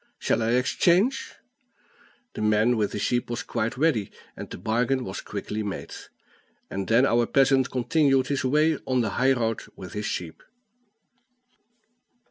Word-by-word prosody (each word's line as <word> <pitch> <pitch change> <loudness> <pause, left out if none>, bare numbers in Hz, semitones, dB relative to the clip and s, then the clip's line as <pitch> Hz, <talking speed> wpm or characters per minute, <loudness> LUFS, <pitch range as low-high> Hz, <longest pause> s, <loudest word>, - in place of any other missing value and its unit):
Shall - - 0
I 115 +1 +1
exchange?" 175 - +2 1.0
The - - -6
man 110 +3 +3
with 105 -2 0
the - - -4
sheep 120 +4 -1
was 120 0 -3
quite 115 +2 -3
ready, 135 -9 +1 0.3
and - - -8
the - - -7
bargain 125 +7 0
was 95 -4 -6
quickly 105 +1 -5
made. 100 -2 -5 0.8
And 95 0 -3
then 115 +4 +4
our 120 -2 +2
peasant 135 -1 +3
continued 135 0 +2
his 140 0 -2
way 150 +3 +2
on 130 -1 +2
the 110 - -1
high 135 +1 +5
road 115 -3 -1 0.2
with 95 - -10
his 105 0 -3
sheep. 85 -3 -5
120 Hz, 150 wpm, -25 LUFS, 110-135 Hz, 1.0 s, high